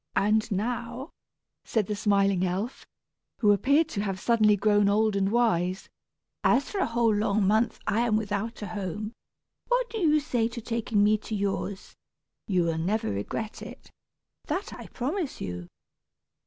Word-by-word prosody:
"And 215 +2 +2
now," 240 - -3 0.5
said 220 -3 0
the 210 - -3
smiling 200 -2 +2
elf, 190 +7 -3 0.5
who 210 -3 +4
appeared 280 +10 +3
to 205 -10 -2
have 195 -2 -2
suddenly 215 -1 +4
grown 205 0 +3
old 215 0 +2
and 195 0 +1
wise, 190 -5 +1 0.5
"as 265 +3 +3
for 405 - -2
a - - +2
whole 230 -1 +2
long 205 0 +1
month 220 +3 +2
I 215 - +1
am 235 -2 +2
without 215 +1 -3
a - - -4
home, 210 +2 -4 0.5
what - - +1
do 450 - -3
you 310 -4 +4
say 245 -6 0
to 235 +1 -7
taking 225 -2 0
me 210 +1 +4
to 215 +1 -5
yours? 200 0 -3 0.5
You 185 -3 +2
will 165 -1 -1
never 190 - 0
regret 100 - -4
it, - - -11 0.6
that 380 - -3
I - - -9
promise 295 +5 -3
you." 90 -1 -5
215 Hz, 160 wpm, -27 LUFS, 200-235 Hz, 0.6 s, who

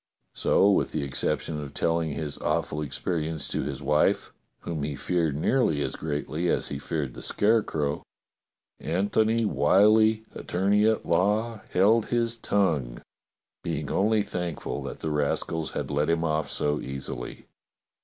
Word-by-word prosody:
So 100 - +3
with - - +1
the 75 - -1
exception 75 +2 -2
of 70 -1 -8
telling 80 -2 0
his 75 0 -4
awful 75 - -1
experience 80 +1 -2
to - - -1
his - - -5
wife, 75 0 +2 0.3
whom 80 -3 -4
he 70 0 -2
feared 80 -1 0
nearly 80 - +2
as - - -3
greatly 75 +3 -2
as - - 0
he 70 - -4
feared 70 -2 -3
the - - -9
Scare 110 +2 +3
crow, 75 -6 -2 0.8
Antony 110 +5 +1
\Miyllie, 110 +2 +4
attorney 100 +4 +1
at 110 -1 +1
law, 105 +5 +1
held 105 +4 +3
his 115 -1 0
tongue, 80 - 0 0.6
being - - -3
only 105 +1 +2
thankful 90 -5 -4
that - - -7
the 80 - -2
rascals 75 +2 -1
had - - -3
let 75 +2 +1
him 85 0 +1
off 80 -3 0
so 75 0 0
easily. 65 -2 -6
85 Hz, 145 wpm, -27 LUFS, 75-105 Hz, 0.8 s, Miyllie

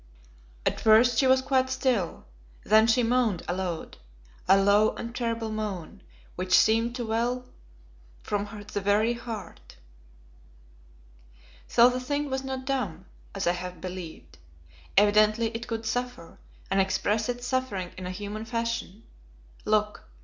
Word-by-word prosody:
At - - 0
first 225 +2 +5
she 265 - +4
was 260 0 +4
quite 260 -1 +1
still, 260 -8 -1 0.4
then 220 +2 +5
she 230 +2 +3
moaned 230 -6 +1
aloud, 175 -2 -4 0.5
a 195 - +6
low 205 +2 +4
and 235 +1 -7
terrible 230 -2 -2
moan, 210 -6 -5 0.3
which 185 0 +3
seemed 230 +2 +3
to 245 -2 -3
well 240 +3 -1 0.8
from 205 0 -1 0.3
the 205 - -1
very 210 +4 +2
heart. 225 - -8 1.9
So 235 +1 +6
the 250 0 0
thing 285 +2 -2
was 265 0 -2
not 265 -1 -5
dumb, 205 - -2 0.3
as 195 - -2
I 175 - +4
had 180 0 -6
believed. 180 - -8 0.6
Evidently 215 +2 +4
it 230 +1 -5
could 225 -1 -4
suffer, 245 -6 -4 0.3
and 195 0 +4
express 210 +3 0
its 245 0 -3
suffering 245 -8 -2
in 185 -1 -6
a - - -4
human 205 +3 -5
fashion. 230 -3 -3 0.6
Look! 210 0 0
220 Hz, 135 wpm, -27 LUFS, 195-245 Hz, 1.9 s, a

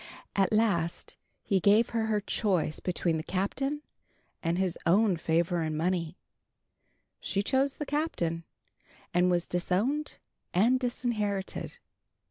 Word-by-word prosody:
At 195 -2 +3
last 190 -6 +1 0.3
he 195 - +2
gave 210 +5 +4
her 225 -1 0
her 210 -1 +1
choice 185 -7 0
between 170 -2 0
the 155 - -4
Captain 270 - -2 0.6
and 165 +1 0
his 185 -2 0
own 195 +2 +4
favor 170 +2 +1
and 155 -1 -2
money. 170 +1 -1 1.0
She 200 0 -1
chose 270 +4 +1
the 295 - -3
Captain, 225 - -1 0.7
and 180 +1 +4
was 175 -1 +1
disowned 210 +12 -1 0.4
and 235 +8 +4
disinherited. 215 -6 -2
190 Hz, 120 wpm, -29 LUFS, 175-230 Hz, 1.0 s, gave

